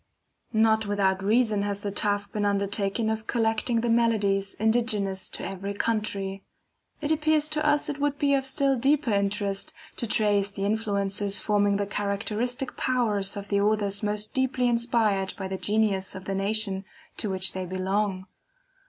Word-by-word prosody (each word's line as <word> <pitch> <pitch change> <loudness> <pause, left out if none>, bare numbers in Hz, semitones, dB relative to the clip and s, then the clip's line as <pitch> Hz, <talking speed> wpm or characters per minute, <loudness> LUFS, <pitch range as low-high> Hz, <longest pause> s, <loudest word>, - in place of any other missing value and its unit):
Not 220 -1 +3
without 195 -2 +1
reason 215 0 +2
has 200 0 -2
the 205 - -3
task 205 0 0
been 210 - -1
undertaken 200 +2 0
of 220 0 -2
collecting 230 0 +1
the 235 - -1
melodies 210 -4 +1
indigenous 215 -4 +1
to - - -5
every 195 +1 -5
country. 200 -3 -2 0.6
It 300 +1 -1
appears 310 -1 +2
to 305 0 -1
us 295 -1 +2
it 290 -1 -4
would 290 0 0
be 280 -1 +2
of 270 -1 +2
still 270 0 +2
deeper 270 0 +2
interest, 200 0 -1 0.2
to 235 - -2
trace 205 -2 +2
the 200 0 -4
influences 200 -1 0
forming 205 -1 +2
the 200 - -1
characteristic 210 +5 -2
powers 210 -6 0
of 200 0 -7
the 200 -1 +2
authors 205 -1 +1
most 210 0 -1
deeply 260 -1 +1
inspired 230 -5 +1
by 190 - -4
the 190 0 -4
genius 205 -3 0
of 190 - -8
the 195 - -2
nation 195 0 +1 0.3
to 215 - -1
which 190 -1 +1
they 185 -1 -4
belong. 190 +1 -1
205 Hz, 160 wpm, -26 LUFS, 200-230 Hz, 0.6 s, Not